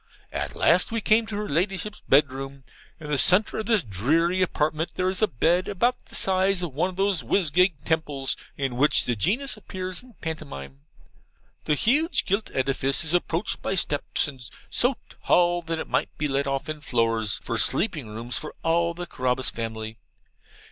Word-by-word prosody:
At - - -3
last - - +3
we 230 - 0
came 220 +1 +3
to 205 - -5
her 210 0 -3
Ladyship's 190 +6 -1
bed 140 0 +5
room. 135 +1 -7 0.4
In 155 - -8
the 145 - +1
centre 195 +5 +3
of 215 - -4
this 220 -6 +3
dreary 160 - +1
apartment 155 -2 0
there 185 0 +1
is 190 - 0
a 215 - +4
bed 170 - +1
about 235 +6 0
the - - -9
size 190 0 +2
of 165 -6 -4
one 165 +7 0
of 185 - -9
those 195 -3 +1
whizgig 175 +2 +2
temples 150 -5 0 0.2
in 135 -3 -2
which 150 +3 +4
the 120 - 0
Genius 215 - 0
appears 185 -2 -3
in 255 - -17
a - - -18
pantomime. 140 - -7 0.9
The 150 - +2
huge 295 - +2
gilt 200 +3 0
edifice 135 +2 +1
is 160 +1 +1
approached 175 +2 0
by 195 - -1
steps, 150 -5 0
and 135 -4 -9 0.3
so 245 +2 +3 0.3
tall, 175 0 +3
that 165 -1 -3
it - - -5
might - - 0
be 150 - 0
let 140 0 0
off 135 +2 -2
in 155 -1 -5
floors, 115 -5 0
for - - -2
sleeping 155 - +2
rooms 115 +3 -5
for 150 - -8
all 170 +1 +1
the 175 +1 -5
Carabas 130 -5 -1
family. 110 -1 -5
165 Hz, 185 wpm, -25 LUFS, 135-190 Hz, 0.9 s, bed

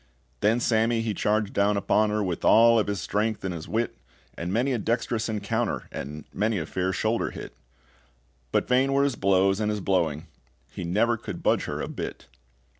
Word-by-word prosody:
Then 110 +3 +3
Sammy 115 -1 +2
he 115 -2 -1
charged 105 0 0
down 100 +1 +2
upon 105 +2 +2
her 105 0 0
With 90 -4 -3
all 115 0 +6
of 105 - 0
his 100 -2 -2
strength 105 +4 -1
and 95 - -2
his 80 -2 -7
wit, 115 +2 -2 0.4
And 85 +2 -4
many 125 +6 +1
a 120 - -1
dextrous 115 +1 -1
encounter, 105 -2 -2
And 75 +2 -7
many 110 0 0
a 80 - -2
fair 95 +3 -1
shoulder 110 +5 0
hit; - - -9 1.0
But - - +1
vain 130 +2 +3
were 140 0 +3
his 140 -3 +1
blows 95 0 +2
and 105 -1 0
his 105 0 -1
blowing: 85 -5 0 0.5
he - - -6
never 110 +7 +1
could - - -7
budge - - +2
her - - -4
a - - -3
bit. - - -6
105 Hz, 190 wpm, -26 LUFS, 95-115 Hz, 1.0 s, all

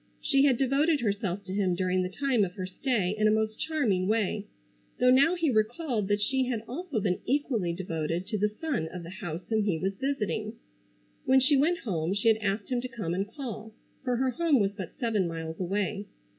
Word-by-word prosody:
She 275 -1 +3
had 265 -4 +4
devoted 280 +4 +2
herself 200 -3 -1
to 185 -1 -6
him 190 -3 +1
during 185 +1 +1
the 180 - -1
time 255 +1 +1
of 180 -2 -2
her 185 -1 -4
stay 200 0 0
in 215 0 +3
a - - +4
most 220 0 0
charming 245 -13 0
way, 210 -1 0 0.5
though 250 0 +5
now 280 +7 +5
he 330 -5 +1
recalled 225 - 0
that 205 0 +1
she 265 +3 +1
had 230 -4 -2
also 300 0 -3
been 190 -3 0
equally 245 -9 +1
devoted 170 -1 -3
to 215 - -2
the 210 +1 +2
son 215 - -2
of 175 +1 -7
the 170 - -8
house 175 -2 -5
whom 220 -2 +1
he 195 -5 +1
was 190 +4 -1
visiting. 215 -5 -2 0.7
When 265 0 +6
she 275 +3 +3
went 315 +6 +3
home 180 -5 -1
she 205 +3 +3
had 220 - +4
asked 205 +1 -2
him 245 -1 +1
to 255 - -4
come 215 -10 -4
and 195 +3 -1
call, 220 -4 -7 0.3
for 250 -2 0
her 260 +1 +1
home 310 0 +2
was 200 -1 +2
but 190 -4 -8
seven 220 -7 +1
miles 165 -1 -5
away. 200 +2 -1
215 Hz, 210 wpm, -28 LUFS, 190-260 Hz, 0.7 s, When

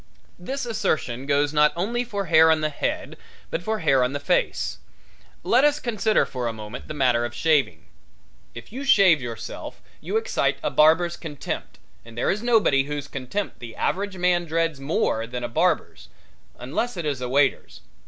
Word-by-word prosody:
This 270 +9 -4
assertion 155 - -2
goes 145 +1 +2
not 150 0 +4
only 230 +8 -1
for 205 -5 -4
hair 160 -1 +6
on 160 -1 +3
the 155 0 -1
head - - -3 0.3
but 165 - -2
for 220 +3 -2
hair 135 -5 +3
on 125 +2 -1
the 145 - -2
face. - - 0 0.6
Let 250 +3 +3
us 295 0 +3
consider 220 -4 +1
for 125 -2 -4
a - - -1
moment 110 +2 -8
the 155 - -6
matter 125 -4 +2
of 120 0 -4
shaving. 155 -1 +1 0.7
If 120 - -11
you 265 +3 -5
shave 195 - +5
yourself 115 -2 -7 0.2
you 440 - -1
excite 450 +2 0
a - - 0
barber's 165 +3 +4
contempt, 150 -5 -6 0.3
and 115 0 -14
there - - +1
is 210 - -2
nobody 215 - +3
whose 145 -1 -5
contempt 140 +10 -4
the 115 -3 -9
average 200 0 -2
man 175 -1 +2
dreads 165 -2 -1
more 135 -5 -1
than 125 0 -5
a - - -1
barber's, 115 - -1 0.5
unless 180 - -3
it 170 - -4
is 140 -4 -2
a 125 - -3
waiter's. 130 - +1
155 Hz, 180 wpm, -24 LUFS, 130-200 Hz, 0.7 s, hair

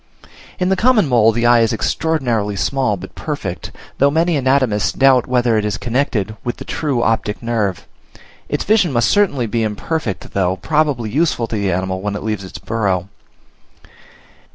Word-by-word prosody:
In 180 0 0
the 190 - +3
common 220 - +3
mole 115 -4 +4
the 120 +1 -1
eye 120 0 +6
is 115 -1 +2
extraordinarily 115 -4 -1
small 110 0 0
but 95 +1 -10
perfect, 125 - -5 0.3
though 140 - +5
many 165 +3 +1
anatomists 130 -6 +1
doubt 130 -3 +4
whether 120 -3 +2
it - - -2
is 105 -1 -2
connected 115 -5 -1
with 120 - -3
the - - -9
true 140 -6 -1
optic 110 0 -1
nerve; 110 -6 -1 0.6
its - - -1
vision 205 -6 +2
must 120 -3 +2
certainly 175 -12 +2
be 115 +1 -1
imperfect, 110 - -3
though 95 -1 +1
probably 145 -2 0
useful 150 -4 +1
to 115 - -5
the 100 -2 0
animal 95 +1 -2
when 100 0 -3
it - - -5
leaves 105 -3 -3
its 95 - -8
burrow. 100 -4 -2
115 Hz, 170 wpm, -18 LUFS, 105-140 Hz, 0.6 s, eye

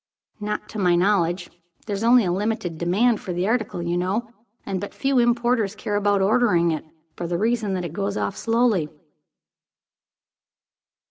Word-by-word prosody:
"Not 210 0 -3
to 215 - -6
my 180 -3 +3
knowledge. 180 -1 +1 0.3
There 205 - -3
is 200 - -4
only 240 -1 +5
a 175 - 0
limited 190 -4 -2
demand 205 +7 +2
for 180 - -5
the 175 +2 -1
article, 220 -6 -1
you 170 0 -1
know, 205 +6 -2 0.3
and 190 -2 -3
but 205 - -7
few 270 -2 +1
importers 235 -3 +1
care 210 -1 -3
about 205 -1 +2
ordering 195 -6 +3
it, 155 - -3 0.3
for 175 - -4
the 170 0 -1
reason 220 -1 0
that 180 -1 -3
it 165 - -6
goes 200 +2 -2
off 200 - -2
slowly." 225 -9 +1
205 Hz, 170 wpm, -23 LUFS, 180-225 Hz, 0.3 s, only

